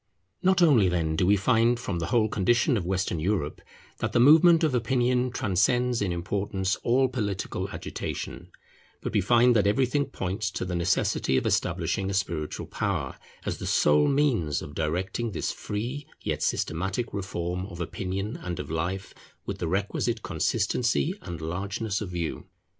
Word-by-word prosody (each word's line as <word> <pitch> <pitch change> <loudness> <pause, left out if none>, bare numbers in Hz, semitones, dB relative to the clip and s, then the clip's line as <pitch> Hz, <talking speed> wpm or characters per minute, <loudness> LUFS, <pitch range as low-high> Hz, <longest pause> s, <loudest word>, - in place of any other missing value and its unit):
Not 185 -1 +4
only 120 - +5
then 80 -3 0
do 90 - +2
we 100 +1 +5
find 115 +3 +3
from 100 -8 -3
the 85 - -2
whole 115 -2 +3
condition 120 - +2
of 90 -6 -2
Western 95 -3 -1
Europe 85 -3 -1 0.4
that - - -2
the - - +3
movement 160 +6 +7
of 155 -4 +2
opinion 125 +1 +1
transcends 120 +3 +1
in 100 -3 0
importance 95 +2 -1
all 130 +2 +2
political 105 -7 -3
agitation; - - -6 0.5
but - - -4
we 105 - +3
find 120 +4 +4
that 105 -2 +3
everything 130 +6 +2
points 95 +3 -3
to 95 - -4
the 90 - -4
necessity 85 -6 +1
of - - 0
establishing 95 0 0
a 100 - -2
spiritual 85 -6 -2
power, - - -2 0.3
as - - -3
the - - -4
sole 75 0 +4
means 130 - +1
of 70 - -9
directing 95 +9 -2
this - - -2
free 120 +8 -4
yet - - -3
systematic 95 +8 -1
reform 90 -2 -3
of 90 -4 -10
opinion 95 +4 -3
and 90 -1 -5
of - - -5
life 90 +5 -3 0.3
with - - -5
the 85 - -2
requisite 100 +5 -1
consistency 120 - 0
and 85 -3 -7
largeness 100 +5 -3
of 100 - -4
view. 85 -3 -4
100 Hz, 165 wpm, -27 LUFS, 90-120 Hz, 0.5 s, movement